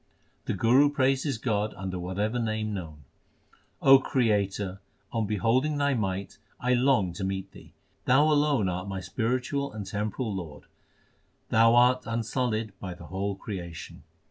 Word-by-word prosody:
The - - -1
Guru 130 +5 +4
praises 135 -1 +1
God 110 -2 -1
under 95 -1 -4
whatever 100 +7 -2
name 110 -2 -2
known: 80 -6 -7 0.8
O 135 0 +8
Creator, 100 -6 0 0.3
on 115 -3 0
beholding 120 +9 +1
Thy 140 0 +2
might 100 -4 -3 0.2
I 125 +1 +1
long 125 -8 +2
to 90 - -5
meet 95 0 -3
Thee. - - -15 0.3
Thou 130 +3 +5
alone 150 -8 +3
art 90 +1 -3
my 95 -1 -4
spiritual 125 +8 -2
and 105 -2 -6
temporal 105 +3 -3
Lord; 85 -6 -7 0.9
Thou 115 +1 +5
art 125 +1 +4
unsullied 115 -1 -1
by 95 -3 -6
the 85 - -12
whole 95 +4 -3
creation. 90 -4 -7
110 Hz, 145 wpm, -27 LUFS, 95-125 Hz, 0.9 s, O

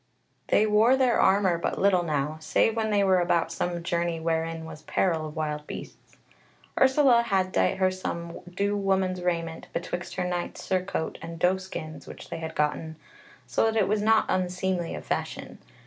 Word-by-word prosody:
They 215 - +4
wore 220 +5 +4
their 255 -3 +3
armour 190 -3 +3
but - - -2
little 190 -2 +3
now, 150 -2 -1
save 220 +7 +2
when 220 -1 0
they 205 -1 +3
were 190 -1 +4
about 170 -2 +1
some 175 0 -2
journey 170 -1 -1
wherein 165 0 -2
was 155 -1 -9
peril 165 -4 0
of 150 - -10
wild 150 -1 -3
beasts. - - -10 0.6
Ursula 265 -2 +5
had 190 -5 0
dight 95 - +1
her 185 -1 +2
some 170 -2 -5
due 200 +3 0
woman's 190 -2 0
raiment 165 -2 -2
betwixt 175 0 -4
her 180 - -1
knight's 175 -1 -3
surcoat 185 -3 -2
and 165 +1 -7
doe 180 +3 +3
skins 160 -5 -8
which - - -11
they - - -4
had 160 -1 -6
gotten, 155 +1 -1 0.5
so - - 0
that 225 0 +1
it 210 - +3
was 210 +1 +1
not 220 +1 +4
unseemly 180 -1 -1
of - - -8
fashion. - - -4
180 Hz, 180 wpm, -27 LUFS, 165-195 Hz, 0.6 s, Ursula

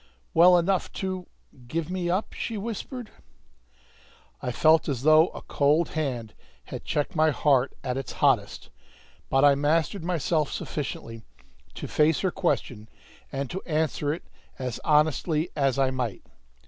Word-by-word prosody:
"Well 180 +2 +7
enough 185 +2 0
to 185 -2 -4 0.4
give 165 +5 -3
me 180 -2 -2
up?" 185 +5 -1
she 225 - -4
whispered. 230 +3 -6 1.3
I 125 - -2
felt 155 +5 +4
as 130 -3 -2
though 155 +2 +6
a - - -10
cold 150 +4 +2
hand 125 -8 -3 0.3
had - - -8
checked 145 +4 -2
my 160 0 +4
heart 140 -2 +2
at 125 -1 -2
its 135 - -5
hottest, 120 -8 +1 0.6
but 135 +1 +4
I 145 - +7
mastered 155 +6 0
myself 165 -3 0
sufficiently 115 -6 -5 0.5
to - - -6
face 155 0 +2
her 190 - +1
question 125 - -2 0.4
and 135 0 -3
to 190 - -4
answer 155 -2 0
it 160 - -5 0.3
as 125 -3 -4
honestly 155 +2 +2
as 140 -3 +1
I 135 -1 +2
might. 125 -5 -3
155 Hz, 145 wpm, -26 LUFS, 135-175 Hz, 1.3 s, Well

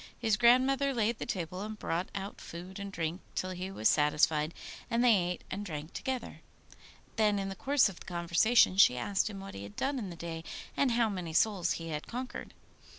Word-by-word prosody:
His 225 -3 +2
grandmother 260 +4 +4
laid 230 0 +1
the - - -4
table, 180 0 -3
and 215 +1 -5
brought 175 -2 -2
out 195 +1 -5
food 180 +3 -8
and 200 0 -5
drink 165 0 -3
till 185 - -2
he 185 +1 -5
was 110 - +1
satisfied, 150 +1 +3 0.4
and 235 +1 +2
they 245 -2 +7
ate 180 -2 -1
and 200 +2 -3
drank 155 -4 -6
together. 260 -1 -4 0.8
Then 210 -2 +3
in 195 0 -2
the 195 - -5
course 275 +4 +3
of 195 -3 -8
the - - -12
conversation 180 +4 +3
she 125 -10 +7
asked 195 - 0
him 200 -2 -7
what 195 0 -8
he 100 - -7
had 100 0 -9
done 275 0 -1
in 205 -5 -5
the 170 - -7
day, 165 -1 -6 0.3
and 265 -4 +2
how 235 -1 +3
many 180 -6 -4
souls 185 -1 +2
he 165 -1 -6
had 150 -1 -4
conquered. 250 +2 -6
195 Hz, 210 wpm, -31 LUFS, 170-225 Hz, 0.8 s, they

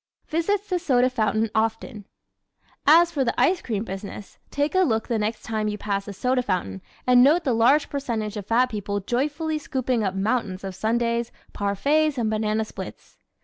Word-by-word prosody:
Visits 390 +6 0
the 365 -3 0
Soda 255 -7 +2
Fountain 220 -2 0
Often 225 +2 -1
¶ 205 - -12 0.8
As 335 +3 +7
for 285 -5 0
the 235 - -1
ice 360 0 +3
cream 215 -3 -2
business, 200 0 -8
take 285 +1 -1
a 375 - +3
look 225 -12 +1
the 230 -3 0
next 215 +1 -2
time 215 -1 -2
you 210 0 -2
pass 200 -1 -3
a 205 - -5
soda 250 +5 0
fountain 175 - -3 0.2
and 250 -1 +6
note 310 +7 +5
the 260 - +1
large 245 +7 +4
percentage 230 -7 -3
of 205 -2 -6
fat 250 +2 +2
people 205 -1 -3
joyfully 295 - -1
scooping 255 -5 -1
up 190 -1 -1
mountains 200 -2 -1
of 190 -1 -5
sundaes, 235 +3 -1 0.2
parfaits 280 +9 +1
and 225 -3 0
banana 215 0 0
splits. - - -10
230 Hz, 185 wpm, -24 LUFS, 210-280 Hz, 0.8 s, As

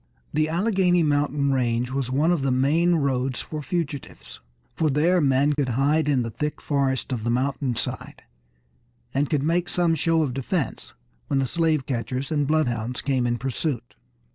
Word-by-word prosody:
The 155 +1 +1
Alleghany 180 -1 +2
Mountain 145 -1 +1
range 125 -1 0
was 135 -2 -2
one 145 +6 +2
of 170 -5 +1
the 135 - 0
main 150 +7 +3
roads 130 -4 0
for 155 -1 -5
fugitives, 150 -2 -5 0.3
for 155 +4 +1
there 165 +6 +3
men 140 +1 +3
could 140 -3 -1
hide 150 +3 +2
in 130 -4 +2
the 115 - -4
thick 150 +6 -3
forests 135 -2 -1
of 115 -3 -3
the 120 - -1
mountainside, 130 0 -2 0.9
and 140 +1 +1
could 145 -3 +1
make 170 +3 +1
some 175 -2 +2
show 165 +1 +2
of 135 -4 -2
defense 135 +4 -3 0.3
when - - 0
the 135 - +2
slave 160 -1 0
catchers 130 +2 -3
and 145 -2 +1
bloodhounds 125 -6 0
came 130 -3 +1
in 120 0 0
pursuit. 130 0 -3
140 Hz, 165 wpm, -24 LUFS, 130-155 Hz, 0.9 s, main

